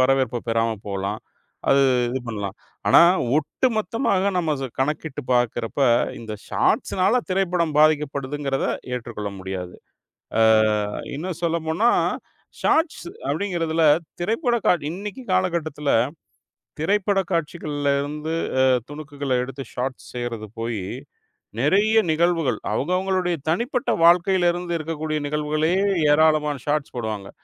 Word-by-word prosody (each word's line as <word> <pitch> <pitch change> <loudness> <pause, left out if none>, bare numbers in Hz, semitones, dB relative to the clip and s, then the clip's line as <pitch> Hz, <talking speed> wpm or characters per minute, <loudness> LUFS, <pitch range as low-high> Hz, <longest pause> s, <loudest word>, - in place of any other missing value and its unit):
வரவேற்ப 130 -2 +2
பெறாம 115 0 +1 0.2
போலாம். 100 0 -3 0.5
அது 140 0 +5 0.3
இது 125 +2 -2
பண்ணலாம். 100 -4 -4 0.3
ஆனா - - +8 0.4
ஒட்டுமொத்தமாக 210 - 0
நம்ம 165 -3 +1
ஸ் - - -3
கணக்கிட்டு 145 +1 -2
பார்க்கிறப்ப, 120 +1 0 0.4
இந்த 110 -2 -7 0.2
ஷார்ட்ஷ்னால 195 +7 +2
திரைப்படம் 180 -4 0
பாதிக்கப்படுதுங்கிறத 145 -2 +1 0.3
ஏற்றுக்கொள்ள 115 -4 -5
முடியாது. 95 -1 -6 0.7
ஆ - - +5 0.7
இன்னும் 170 +3 -5
சொல்லப்போனா, 165 +6 +1 0.7
ஷார்ட்ஷ் 320 0 +1 0.2
அப்படிங்கிறதுல 165 -5 0 0.4
திரைப்படக் 230 - 0
காட் 175 - +3
இன்னைக்கு 205 +7 -6
காலகட்டத்துல 165 -6 0 0.9
திரைப்பட 195 +4 +1
காட்சிகள்ல 150 -3 -2
இருந்து 150 +3 -4 0.3
அ - - +5 0.3
துணுக்குகளை 145 -3 -4
எடுத்து 135 +1 -6
ஷார்ட்ஷ் 130 +1 -4
செய்யறது 120 -3 -4
போயி, 115 -4 -3 0.8
நெறைய 205 - +4
நிகழ்வுகள் 165 -6 +1
அவங்கவங்களுடைய 180 - 0
தனிப்பட்ட 245 - 0
வாழ்க்கையில 175 +1 +5
இருந்து 175 0 -4
இருக்கக்கூடிய 155 -1 -3
நிகழ்வுகளே 150 +2 0 0.4
ஏராளமான 150 -2 +3
ஷார்ட்ஷ் 150 -1 -1
போடுவாங்க. 110 -4 -4
155 Hz, 105 wpm, -23 LUFS, 130-180 Hz, 0.9 s, ஆனா